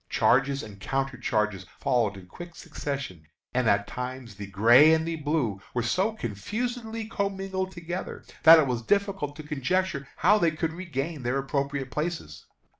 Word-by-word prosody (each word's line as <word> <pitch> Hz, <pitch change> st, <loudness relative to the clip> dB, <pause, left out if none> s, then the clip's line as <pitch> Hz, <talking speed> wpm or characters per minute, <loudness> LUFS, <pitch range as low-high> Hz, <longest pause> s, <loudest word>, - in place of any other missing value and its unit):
Charges 135 Hz, +2 st, +2 dB
and 105 Hz, -3 st, -10 dB
counter 135 Hz, +6 st, -2 dB
charges 105 Hz, -4 st, -1 dB
followed 115 Hz, -7 st, +1 dB
in 95 Hz, -, -11 dB
quick 170 Hz, -, -11 dB
succession, 135 Hz, -, -6 dB, 0.3 s
and 125 Hz, -3 st, +2 dB
at 100 Hz, 0 st, +3 dB
times 125 Hz, -1 st, -6 dB
the 100 Hz, 0 st, -8 dB
"gray" 120 Hz, -, +6 dB
and 160 Hz, 0 st, -1 dB
the 165 Hz, -1 st, -2 dB
"blue" 145 Hz, -10 st, -1 dB
were 120 Hz, -, +1 dB
so 190 Hz, -, +1 dB
confusedly 220 Hz, -, -4 dB
commingled 195 Hz, -3 st, -2 dB
together, 175 Hz, 0 st, -6 dB, 0.2 s
that 165 Hz, +1 st, +10 dB
it 155 Hz, -, +4 dB
was 125 Hz, -3 st, -1 dB
difficult 195 Hz, -, 0 dB
to 155 Hz, -, -8 dB
conjecture 150 Hz, +1 st, -1 dB
how 210 Hz, +4 st, +4 dB
they 170 Hz, -, +4 dB
could 160 Hz, +1 st, -2 dB
regain 160 Hz, -3 st, -4 dB
their 125 Hz, +2 st, 0 dB
appropriate 140 Hz, -1 st, -2 dB
places. 150 Hz, -, -4 dB
140 Hz, 160 wpm, -27 LUFS, 120-175 Hz, 0.3 s, that